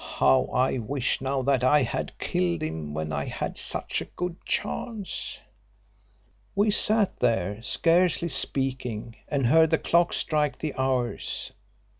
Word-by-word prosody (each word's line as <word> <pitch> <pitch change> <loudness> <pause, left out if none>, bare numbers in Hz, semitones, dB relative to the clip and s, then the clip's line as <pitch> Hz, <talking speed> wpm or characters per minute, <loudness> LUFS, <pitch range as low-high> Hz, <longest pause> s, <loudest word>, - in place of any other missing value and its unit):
How 70 -1 +4
I 130 0 0
wish 130 +3 -1
now 135 0 -1
that 135 -1 +2
I 145 +2 +5
had 115 - -4
killed 85 -2 -1
him 80 -1 -4
when 80 0 -3
I 70 - -2
had - - -4
such - - 0
a - - -5
good 180 -1 -5
chance. 215 -5 -2 1.2
"We 205 +2 +3
sat 210 -1 +3
there 105 -3 0
scarcely 170 +5 +2
speaking, 130 -5 -2
and 140 -3 0
heard 160 +6 +5
the 160 - +3
clock 170 +2 +2
strike 150 -3 0
the 155 -2 -4
hours. 130 -2 -2
130 Hz, 140 wpm, -26 LUFS, 115-160 Hz, 1.2 s, I